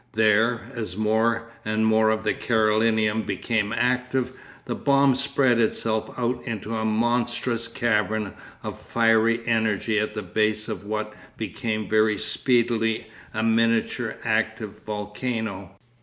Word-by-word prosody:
There, 110 +2 +2
as 110 -6 -5
more 115 +2 +1
and 110 +1 0
more 110 0 +4
of 110 0 0
the - - +1
Carolinum 110 -1 +2
became 110 -3 -1
active, 125 +2 0 0.3
the - - -2
bomb 140 -1 +3
spread 135 -2 +2
itself 110 -1 0
out 125 0 -1
into 115 -2 -4
a 110 - -1
monstrous 115 +1 0
cavern 110 -4 0 0.3
of - - -6
fiery 115 0 +3
energy 110 -1 +1
at 105 0 -2
the 105 - -3
base 105 +3 0
of - - -5
what 105 0 -3 0.2
became 110 -2 -3
very 110 0 +3
speedily 115 -3 0 0.2
a 110 - -2
miniature 115 0 +1
active - - -1
volcano. 105 -2 -4
110 Hz, 125 wpm, -24 LUFS, 110-115 Hz, 0.3 s, more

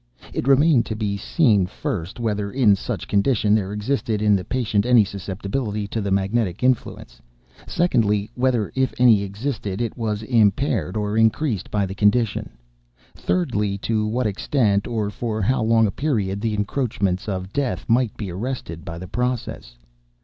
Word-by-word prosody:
It - - -3
remained 140 -2 +4
to 110 - -3
be 105 -2 -2
seen, 105 - +2
first, 90 +2 -5
whether, 105 -3 -2
in 115 -6 +4
such - - -5
condition, 105 0 +2
there 100 -3 +1
existed 110 +1 -1
in 105 -1 +4
the 95 - -1
patient 110 -3 0
any 120 -3 +5
susceptibility 100 +3 -4
to 110 - -2
the 100 - -2
magnetic 100 +1 0
influence; 120 - -1 0.5
secondly, 105 - +1
whether, 125 -4 0
if 130 -4 0
any 120 -5 +5
existed, 100 0 -4
it 115 -3 -2
was 110 -3 -2
impaired 110 -2 +1
or 105 0 -1
increased 110 - +1
by 100 -2 0
the 95 - -5
condition; 105 - +1 0.6
thirdly, 100 +3 -1
to 110 -1 0
what 120 +3 -1
extent, 105 -1 +1
or 110 -3 -2
for 110 0 -3
how 130 +6 +1
long 115 0 +4
a 100 - 0
period, 100 -9 -1
the 110 -1 -1
encroachments 105 -3 -1
of 95 0 -4
Death 140 -3 -2
might 120 -1 +1
be 100 -4 -5
arrested 95 -5 -5
by 85 +1 -7
the 90 +2 -8
process. 120 - -3
105 Hz, 160 wpm, -22 LUFS, 100-120 Hz, 0.6 s, any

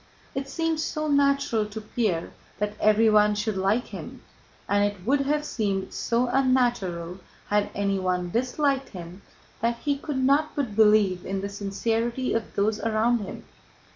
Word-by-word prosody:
It 270 0 -4
seemed 325 0 -1
so 310 -1 -2
natural 280 -6 +2
to 210 +1 -7
Pierre 210 -6 -2 0.3
that 210 0 -2
everyone 215 -1 +4
should 210 0 -1
like 195 +5 +1
him, - - -9 0.4
and 205 0 +2
it 205 -3 -2
would 275 +4 +3
have 295 +2 0
seemed 200 -7 -2
so 240 +1 0
unnatural 240 -10 +1 0.3
had 205 0 +2
anyone 185 -3 0
disliked 270 - 0
him, 180 0 -9 0.4
that 235 +1 0
he 285 -1 +1
could 290 -1 -4
not 280 +4 +2
but 250 -8 -2
believe 210 -4 +4
in 195 0 -3
the 200 - -3
sincerity 225 +5 -1
of 225 -1 -3
those 210 +2 +1
around 225 +2 +1
him. 200 - -7
220 Hz, 150 wpm, -26 LUFS, 200-260 Hz, 0.4 s, everyone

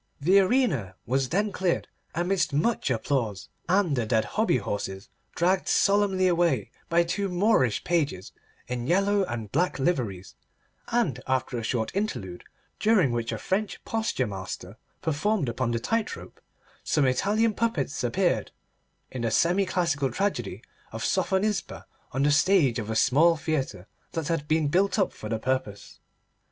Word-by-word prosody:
The 185 +7 +5
arena 195 - +1
was 130 +1 0
then 205 +4 0
cleared 185 -2 -1 0.3
amidst 175 -2 0
much 165 +5 +1
applause, 115 -5 -1 0.2
and 185 -6 +3
the 120 -4 -1
dead 110 -1 +2
hobby 220 - +1
horses 100 -2 -4 0.3
dragged 185 +2 +1
solemnly 200 -2 +3
away 175 -1 +1 0.2
by 170 0 +4
two 195 +3 -2
Moorish 180 - +2
pages 145 - -1 0.4
in 125 0 -3
yellow 200 +4 +3
and 115 - -5
black 175 +5 +1
liveries, 120 - -1 0.5
and 170 - 0
after 130 -1 0
a 120 - -2
short 115 -1 -1
interlude, 100 - -3 0.4
during 205 - +3
which 115 -1 -2
a 115 - -3
French 195 - -2
posture 220 - -1
master 95 -1 -6 0.3
performed 160 +2 0
upon 120 +1 -1
the 115 -1 0
tightrope, 225 - -3 0.4
some 150 -3 +2
Italian 210 - +2
puppets 175 - -1
appeared 175 +9 0 0.6
in 125 - -5
the 115 - 0
semi 180 - +2
classical 145 -8 0
tragedy 200 +1 -2 0.3
of - - -5
Sophonisba 195 +2 0 0.3
on 135 +2 0
the 145 - +4
stage 145 -6 +3
of 110 -1 -5
a 110 - -2
small 155 +9 +4
theatre 140 - -2 0.3
that 165 -1 -3
had 165 -3 -1
been 155 -1 +2
built 190 +8 +2
up 195 - +1
for 110 - -8
the 110 - 0
purpose. 130 -3 -3
155 Hz, 150 wpm, -26 LUFS, 120-195 Hz, 0.6 s, The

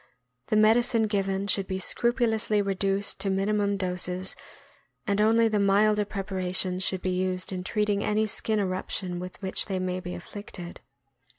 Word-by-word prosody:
The - - 0
medicine 225 +2 +4
given 195 -2 -1
should 195 -1 +1
be 190 - -2
scrupu 240 +5 +2
lously 215 -2 +1
reduced 195 +1 0
to 200 - -2
minimum 200 +1 +1
doses, 180 0 -1 0.7
and 200 -1 +1
only 225 +1 +4
the 215 -2 +1
milder 205 +1 +3
preparations 185 -2 -1
should 190 0 -1
be 185 - 0
used 185 0 -1
in 185 -1 -4
treating 210 0 0
any 215 +1 +1
skin 215 0 0
eruption 185 -1 -2
with 180 0 -8
which 190 - -2
they 195 -3 -2
may 185 0 -2
be 180 -1 -6
afflicted. 175 -2 -9
195 Hz, 160 wpm, -27 LUFS, 185-210 Hz, 0.7 s, medicine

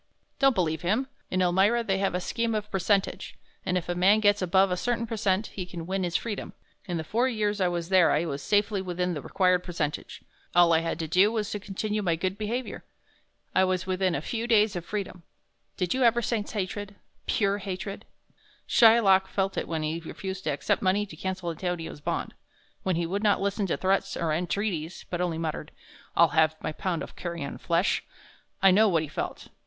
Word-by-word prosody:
"Don't 270 -2 +4
believe 160 -4 0
him. 215 +10 +1 0.2
In 185 0 +1
Elmira 195 +7 +3
they 195 -4 0
have 195 -2 0
a - - +1
scheme 230 +4 -1
of 210 0 -3
percentage, 195 +1 0 0.3
and 180 0 0
if 180 - -4
a 175 - 0
man 190 +4 +4
gets 205 -1 +3
above 190 +1 +3
a - - +2
certain 235 +5 -1
percent 210 -2 0
he 190 - -4
can 175 -2 -7
win 190 +1 -1
his 175 -1 -2
freedom. 215 -3 -3 0.3
In 175 -2 -2
the 160 - -3
four 235 +10 +1
years 210 -3 -1
I 185 - +4
was 175 -1 -3
there 185 -3 +5
I 155 +3 +2
was 145 -3 -4
safely 205 +1 +1
within 180 -1 -2
the 150 - -4
required 180 +4 +2
percentage 155 -4 -4 0.3
all 175 -1 +6
I 160 - +5
had 165 -1 -2
to 165 -2 -3
do 185 +6 +4
was 215 -3 -2
to 210 - -3
continue 210 +2 -3
my 175 -4 +1
good 185 +3 -2
behavior. 225 +4 -4 0.7
I 190 - +4
was 185 -1 0
within 185 -1 0
a 140 - -3
few 230 +4 -3
days 215 -3 +4
of 175 -1 -4
freedom. 200 -4 -4 0.6
Did 180 -2 0
you 260 - -1
ever 240 -1 +4
sense 220 -3 -2
hatred 205 0 -4 0.3
pure 200 -1 +1
hatred? 195 +1 -5 0.6
Shylock 215 -5 +6
felt 195 0 -1
it - - -2
when 160 -2 -2
he 155 +2 -2
refused 190 +3 -6
to - - 0
accept - - 0
money 195 +2 +2
to 175 - -11
cancel 185 0 -3
Antonio's 165 -2 -4
bond; - - -3 0.5
when 185 -2 0
he 170 +1 0
would 195 +4 -2
not 205 -2 +3
listen 200 0 -1
to - - -1
threats 195 +1 0
or 165 -2 0
entreaties, 175 -1 -2
but 175 0 -1
only 175 -3 -1
muttered, 160 -1 -3 0.5
'I'll 170 -1 +6
have 155 +1 +3
my - - -3
pound 170 +1 -2
of - - -10
carrion 170 -5 -5
flesh.' 170 +3 +1 0.6
I 195 - +8
know 210 +3 +5
what 165 -4 +2
he - - -5
felt. - - -5
190 Hz, 205 wpm, -27 LUFS, 175-205 Hz, 0.7 s, I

